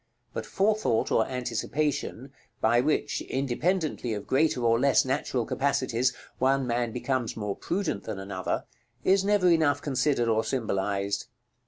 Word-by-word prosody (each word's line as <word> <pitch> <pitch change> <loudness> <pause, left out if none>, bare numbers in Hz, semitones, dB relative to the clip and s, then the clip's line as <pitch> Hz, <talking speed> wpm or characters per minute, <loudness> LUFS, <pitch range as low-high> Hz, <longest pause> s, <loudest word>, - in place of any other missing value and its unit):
But - - -4
forethought 205 - +1
or 110 - +3
anticipation, 135 +2 -2 0.3
by 120 +2 +4
which, 150 +4 0
independently 140 0 -1
of 105 - -6
greater 135 -2 +2
or 115 0 +4
less 140 0 +4
natural 130 -2 -1
capacities, 130 -2 +1 0.3
one 135 +1 +2
man 120 -1 0
becomes 125 -1 -2
more 105 -2 -2
prudent 175 - -2
than 110 -3 -4
another, 95 -1 -3 0.4
is 195 +1 +4
never 205 -2 +3
enough 160 -5 +4
considered 135 -3 +1
or 110 0 +2
symbolized. 100 -4 -1
130 Hz, 135 wpm, -27 LUFS, 115-150 Hz, 0.4 s, by